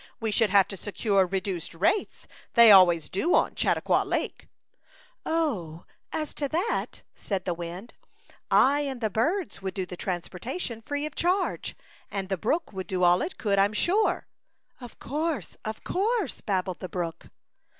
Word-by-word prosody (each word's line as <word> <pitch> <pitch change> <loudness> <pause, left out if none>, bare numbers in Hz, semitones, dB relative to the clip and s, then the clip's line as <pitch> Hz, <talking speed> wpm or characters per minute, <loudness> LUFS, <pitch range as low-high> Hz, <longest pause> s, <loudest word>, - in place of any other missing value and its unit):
We 225 -3 -1
should 210 +1 +3
have 195 -1 +5
to 195 - -6
secure 200 -1 +1
reduced 185 -3 -3
rates. 200 - 0 0.3
They 235 -2 +9
always 175 -5 +7
do 315 - +1
on - - +2
Chautauqua - - +2
Lake/* - - -3 0.4
" - - -26 0.2
Oh! 210 - -1 0.3
as 305 -1 -3
to 285 -2 -2
that/' 360 - -2
said 195 -3 -4
the 180 - 0
wind, 175 +6 -7 0.4
" - - -28 0.2
I 290 - +1
and 275 -3 -3
the 220 -3 -1
birds 325 - -1
would 190 -1 -4
do 190 - -2
the 180 - -8
trans 175 -1 -3
portation 230 - -5
free 290 +3 -3
of 305 - -6
charge, 365 +2 0 0.3
and 195 -2 -4
the 190 - +1
brook 235 - -1
would 190 -1 -5
do 185 -1 -1
all 175 +1 +5
it 370 - -4
could, 200 -4 +1
Fm 200 +2 +3
sure/' 390 - +2 0.6
"Of 245 -2 -11
course, 310 +3 -3
of 220 0 -5
course,'* 445 +6 -1
babbled 185 -3 -2
the 185 - -6
brook. 170 -3 -4
210 Hz, 170 wpm, -27 LUFS, 185-295 Hz, 0.6 s, They